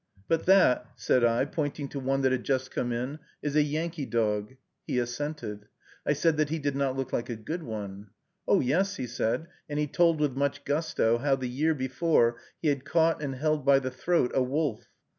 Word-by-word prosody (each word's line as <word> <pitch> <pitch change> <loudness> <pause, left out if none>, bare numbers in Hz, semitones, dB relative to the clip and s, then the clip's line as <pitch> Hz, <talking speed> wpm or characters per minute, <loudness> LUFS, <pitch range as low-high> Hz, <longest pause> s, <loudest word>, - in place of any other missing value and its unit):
"But 165 +1 0
that," 180 -10 +5
said 125 - +2
I, 115 0 +3
pointing 145 -2 -3
to 140 - -5
one 135 +1 0
that 130 -1 +3
had 130 -2 0
just 130 -1 -1
come 120 - -2
in, 125 +6 -3 0.2
"is 145 -1 -2
a 155 - +6
Yankee 155 0 -2
dog." 105 +1 0 0.3
He - - -1
assented. 120 -4 -3 0.4
I - - +4
said 165 -2 +2
that 155 -1 +1
he 160 - -1
did 145 -2 -2
not 135 -1 0
look 135 -1 -3
like 120 - -1
a 120 - -2
good 155 +11 -5
one. 105 -5 -6 0.4
"Oh, - - +4
yes!" 190 +10 +1
he 130 - -3
said, 120 +6 -1 0.2
and 145 - -3
he 150 - +2
told, 165 +2 +2
with 145 -4 +1
much 140 0 -1
gusto, 145 -6 +1
how, 140 +1 +2
the 130 -1 -5
year 150 +6 +1
before, 130 -2 +2 0.3
he 155 - +3
had 140 -2 0
caught 160 +2 +2
and 140 -3 -3
held 155 +2 0
by 140 0 +6
the 130 -1 -2
throat 130 +1 +1
a 130 - +3
wolf. 135 -2 -1
140 Hz, 210 wpm, -28 LUFS, 125-155 Hz, 0.4 s, a